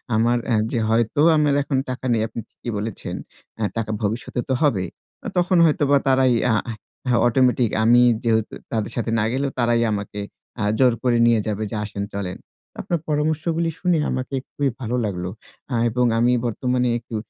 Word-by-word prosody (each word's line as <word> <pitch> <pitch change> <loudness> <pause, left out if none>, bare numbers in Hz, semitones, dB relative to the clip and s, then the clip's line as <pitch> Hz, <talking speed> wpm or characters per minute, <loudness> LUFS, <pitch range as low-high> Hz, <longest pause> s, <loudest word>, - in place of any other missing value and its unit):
আমার 120 +2 +3
অ্যা 115 -3 +2
যে 120 - 0
হয়তো 115 +4 +1 0.2
আমার 150 -1 +3
এখন 140 -1 -1
টাকা 130 0 -5
নেই 110 - +1
আপনি 115 - -7
ঠিকই 120 - -7
বলেছেন। 105 0 -5 0.4
অ্যা 110 - -1
টাকা 110 -1 -2
ভবিষ্যতে 110 +3 -2
তো - - +2
হবে। 110 -12 +2 0.4
অ - - -2
তখন 180 0 +3
হয়তো 150 -2 +2
বা 140 - +6
তারাই 130 -1 +4 0.2
আ - - +3
হা 115 - -3 0.4
হা 120 - +3
অটোমেটিক 125 -1 +3
আমি 120 +2 +6 0.2
যেহেতু 110 -2 +1 0.2
তাদের 110 -2 -2
সাথে 115 -1 -2
না 105 - +1
গেলেও 135 +1 -1
তারাই 120 0 +2
আমাকে 105 0 -4 0.4
আ - - +1 0.2
জোর 125 -2 +5
করে 125 -2 +3
নিয়ে 120 -1 +4
যাবে 105 0 -2
যে - - -3
আসেন 100 -1 -5
চলেন। 100 -2 -4 0.4
আপনার 170 -2 -1
পরামর্শগুলি 160 +2 0
শুনে 180 -2 +2
আমাকে 130 +1 -3 0.2
খুবই 140 -2 0
ভালো 125 -1 -2
লাগলো। 90 -3 -3 0.4
আ - - +1
এবং 125 +2 +1
আমি 120 +1 +3
বর্তমানে 125 +2 0
একটু 115 -1 -9
120 Hz, 185 wpm, -22 LUFS, 110-135 Hz, 0.4 s, বা